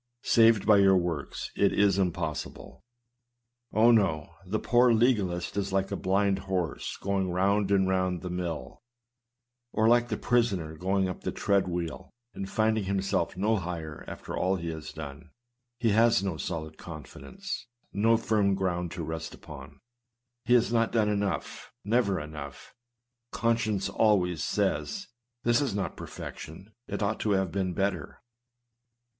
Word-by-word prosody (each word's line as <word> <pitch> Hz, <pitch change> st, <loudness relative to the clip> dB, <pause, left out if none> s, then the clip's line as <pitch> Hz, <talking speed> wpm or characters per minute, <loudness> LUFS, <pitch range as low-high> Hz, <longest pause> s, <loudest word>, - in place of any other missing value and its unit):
Saved 115 Hz, -2 st, +5 dB
by 105 Hz, -1 st, +6 dB
your 95 Hz, -1 st, +6 dB
works! 85 Hz, -5 st, -3 dB
It 100 Hz, -, +3 dB
is 100 Hz, -1 st, +3 dB
impos 85 Hz, -4 st, -1 dB
sible! -, -, -13 dB, 0.9 s
Oh! 115 Hz, +2 st, +5 dB
no, 95 Hz, -10 st, +2 dB
the 105 Hz, +4 st, 0 dB
poor 120 Hz, +2 st, +4 dB
legalist 105 Hz, -8 st, +1 dB
is 100 Hz, -1 st, -1 dB
l&e 95 Hz, 0 st, +2 dB
a -, -, 0 dB
blind 100 Hz, +1 st, +1 dB
horse 95 Hz, -4 st, -3 dB
going 95 Hz, -1 st, -1 dB
round 100 Hz, +3 st, +1 dB
and 95 Hz, -1 st, +3 dB
round 95 Hz, -1 st, 0 dB
the 90 Hz, -, -4 dB
mill, 85 Hz, -7 st, -4 dB, 0.9 s
or 110 Hz, -, +2 dB
like 120 Hz, +1 st, +4 dB
the -, -, -2 dB
prisoner 100 Hz, -10 st, 0 dB
going 95 Hz, +3 st, 0 dB
up 90 Hz, -, -5 dB
the -, -, -2 dB
treadwheel, 90 Hz, -5 st, -1 dB, 0.2 s
and 95 Hz, 0 st, -5 dB
finding 110 Hz, -1 st, +1 dB
himself 95 Hz, -2 st, -1 dB
no 110 Hz, +3 st, +2 dB
higher 85 Hz, -4 st, -5 dB
after -, -, -7 dB
all 95 Hz, +1 st, +1 dB
he 85 Hz, -2 st, -4 dB
has 80 Hz, -1 st, -7 dB
done; 75 Hz, 0 st, -9 dB, 0.5 s
he 120 Hz, -2 st, +1 dB
has 115 Hz, -2 st, +4 dB
no 95 Hz, -4 st, -1 dB
solid 80 Hz, -1 st, -5 dB
confidence, 85 Hz, -, -8 dB, 0.3 s
no 115 Hz, +3 st, +4 dB
firm 105 Hz, -3 st, +2 dB
ground 90 Hz, -2 st, -1 dB
to 90 Hz, -2 st, -4 dB
rest 80 Hz, 0 st, -5 dB
upon. -, -, -12 dB, 0.7 s
He 120 Hz, +1 st, +5 dB
has 120 Hz, 0 st, +3 dB
not 115 Hz, -1 st, +2 dB
done 110 Hz, -2 st, +2 dB
enough 100 Hz, -1 st, -2 dB
— -, -, -57 dB
"never 105 Hz, -3 st, +2 dB
enough;" 75 Hz, -2 st, -9 dB, 0.6 s
conscience 115 Hz, -4 st, 0 dB
always 100 Hz, -5 st, +2 dB
says, 180 Hz, -, -1 dB, 0.3 s
"this 120 Hz, +3 st, +3 dB
is 130 Hz, -8 st, -1 dB
not 95 Hz, -4 st, -2 dB
perfection; 95 Hz, +7 st, -9 dB
it -, -, -3 dB
ought 110 Hz, +2 st, -1 dB
to 105 Hz, -, +1 dB
have 95 Hz, -3 st, +1 dB
been 95 Hz, -3 st, -1 dB
better." 95 Hz, -6 st, -2 dB
95 Hz, 150 wpm, -28 LUFS, 90-110 Hz, 0.9 s, by